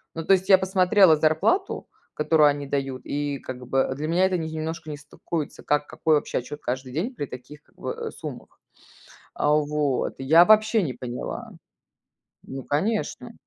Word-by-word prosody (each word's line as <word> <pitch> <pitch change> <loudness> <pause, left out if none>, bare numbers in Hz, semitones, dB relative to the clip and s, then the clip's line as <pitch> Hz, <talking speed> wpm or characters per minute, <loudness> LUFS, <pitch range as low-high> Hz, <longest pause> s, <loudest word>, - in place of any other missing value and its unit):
Ну, 165 -1 -5
то 195 - +5
есть 190 +1 +1
я 190 - +9
посмотрела 190 -2 +4
зарплату, 160 - +1 0.3
которую 150 0 +4
они 145 -1 -3
дают, 135 -2 -3
и 145 -1 -3
как 125 -1 -8
бы, 135 0 +1
для 155 +2 -4
меня 180 +3 +3
это 185 -1 +1
немножко 160 0 -5
не 145 - -5
стыкуется, 150 +2 -6
как 150 0 0
какой 160 -2 +1
вообще 145 - -1
отчет 145 +4 -8
каждый 130 +1 -4
день 225 - -3
при 145 - -3
таких, 135 +4 -11
как - - -32
бы, - - -5
э, - - -6
суммах. - - -9 0.7
А, 150 - +1
вот. 150 -2 0
Я 160 +6 +6
вообще 215 -1 +4
не 130 -5 -3
поняла. 125 0 -6 0.9
Ну, 135 0 -7
конечно. 205 +10 -2
150 Hz, 170 wpm, -24 LUFS, 140-180 Hz, 0.9 s, я